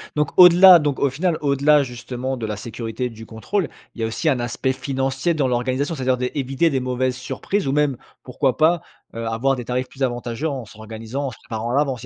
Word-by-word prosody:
Donc 150 0 0
au-delà 180 0 +9
donc, 145 -3 -1
au 140 - +2
final, 165 +4 0
au-delà, 145 +1 +3
justement 125 +1 -5
de 115 - -4
la 105 - -3
sécurité 115 +2 -5
et - - -2
du 110 0 -11
contrôle, 160 - -2 0.2
il 115 - -8
y - - 0
a - - +1
aussi 135 +8 -1
un 130 -4 +1
aspect 125 +2 -1
financier 135 +4 -1
dans 140 -4 +1
l'organisation. 130 +5 -1
C'est-à-dire 130 -4 0
d'é 125 0 -2
éviter 135 +5 +1
des 135 - 0
mauvaises 130 0 -1
surprises 135 +8 -3
ou 135 - 0
même, 145 -3 +2 0.3
pourquoi 130 0 -1
pas, 160 +1 +3 0.3
heu, 115 0 -5
avoir 130 +5 +1
des 125 - -6
tarifs 125 +2 -2
plus 135 - -15
avantageux 120 +4 -2
en 130 -4 -5
s'organisant, 110 +5 -6
en - - -4
se - - -13
préparant 115 +1 -4
à - - 0
l'avance, 135 -4 0
il - - -8
130 Hz, 230 wpm, -21 LUFS, 120-145 Hz, 0.3 s, au-delà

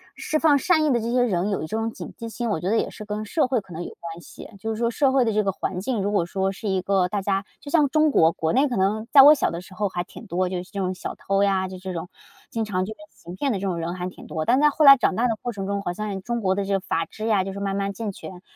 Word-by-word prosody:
释 310 - -1
放 300 -3 +5
善 315 +2 +2
意 290 - +3
的 240 - +2
这 230 +1 -3
些 250 0 +3
人 195 -4 0
有 200 - -1
一 155 - -4
种 225 +5 -2
警 - - -9
惕 230 - -6
心， 235 +1 -3
我 205 - 0
觉 180 - -2
得 225 - +2
也 - - 0
是 - - -9
跟 210 +1 -4
社 305 +8 +1
会 255 -2 +1
可 185 -3 -14
能 165 +2 -5
有 - - -6
关 170 0 -8
系。 - - -12
就 220 - -4
是 220 - -3
说 235 0 +1
社 270 +3 +2
会 265 -2 +3
的 225 - 0
这 215 0 +2
个 195 - +1
环 185 -1 -4
境， 225 0 -1
如 200 +1 -1
果 185 -5 +2
说 190 +2 -1
是 210 +3 -7
一 190 -1 +1
个 185 -1 +1
大 205 +1 -2
家 195 0 0 0.2
就 285 - -10
像 300 -3 +3
中 310 +2 +3
国 165 -10 +5
国 160 -1 -1
内 270 +4 +4
可 245 - -2
能 205 +3 +1
在 280 - +9
我 295 +3 +9
小 - - 0
的 170 - -4
时 185 - -14
候 200 +2 -1
还 175 -1 -3
挺 230 - -12
多 185 -2 -1
就 180 -1 -3
是 180 - -19
这 200 - -5
种 185 -1 -1
小 - - -6
偷 195 0 0
呀， 190 -1 +1
就 185 0 -8
这 185 +1 -6
种 170 +1 -5 0.4
经 225 - -2
常 185 -3 -1
就 215 - -6
说 - - -33
行 175 +1 -11
骗 275 +7 -1
的 205 - -1
这 195 - -2
种 180 -3 -1
人 165 +1 -3
还 180 0 -4
挺 - - -13
多。 155 -2 -4
但 240 - +4
是 - - +2
在 295 - +6
后 300 +1 +2
来 275 0 +11
长 225 -6 +1
大 240 +2 +2
的 225 - 0
过 245 - -3
程 195 -3 -5
中， 200 0 -1
好 175 - -3
像 205 0 -4
中 235 +4 -2
国 190 -2 +1
的 200 - -1
这 200 - -1
个 195 - +2
法 165 -3 -2
制 215 +6 -6
呀， 205 -4 +3
就 195 - -5
是 200 - -7
慢 195 -1 -2
慢 200 0 -1
健 215 0 -4
全， 180 -1 -10
200 Hz, 360 characters per minute, -24 LUFS, 185-235 Hz, 0.4 s, 来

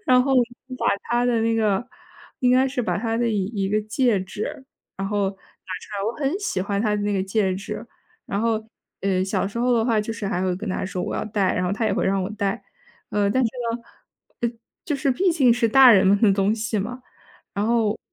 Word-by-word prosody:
然 250 0 +6
后， 270 +1 0 0.5
把 - - -1 0.2
她 240 0 0
的 240 -2 +2
那 225 0 +1
个 215 0 +1 0.6
应 250 -2 +3
该 260 +1 +4
是 260 -1 -2
把 225 - -1
她 225 +1 -1
的 235 0 +1
一 205 -4 0
一 200 -2 -2
个 210 +2 +1
戒 220 -1 +1
指， 205 +7 -6 0.3
然 195 0 -3
后 205 -1 +1
拿 - - -13
出 - - -28 0.6
来， 195 - -2
我 225 - 0
很 295 +6 -1
喜 400 - -2
欢 200 +1 -1
她 210 -1 +1
的 205 - -1
那 205 0 0
个 195 - +1
戒 190 -1 0
指。 210 +3 -6 0.4
然 200 - -2
后 225 -1 0 0.4
呃， 190 -1 +1
小 190 0 -1
时 205 - -6
候 245 +1 +2
的 230 -2 +2
话， 225 -3 +2
就 215 +2 -4
是 215 -2 -5
还 195 -4 -1
会 185 -1 0
跟 205 +4 -5
她 - - -2
说： 185 -1 -4
“我 - - -3
要 - - -2
戴，” 205 -3 0
然 180 - 0
后 180 - 0
她 220 +3 -1
也 215 - +1
会 - - 0
让 195 0 +1
我 185 - -3
戴。 200 -2 -2 0.5
呃， 205 -1 +1
但 260 +6 +2
是 235 - +2 0.2
呢 235 - -3 0.6
呃， 235 - +1 0.3
就 320 -7 -1
是 275 0 0
毕 360 +8 +2
竟 265 -7 +4
是 235 -1 +2
大 265 +2 +8
人 195 -4 +6
们 200 +1 +4
的 210 -3 +6
东 195 +2 +2
西 220 -1 -2
嘛， 245 +6 -4 0.5
然 205 +1 0
后 225 -2 +1
215 Hz, 260 characters per minute, -23 LUFS, 200-240 Hz, 0.6 s, 大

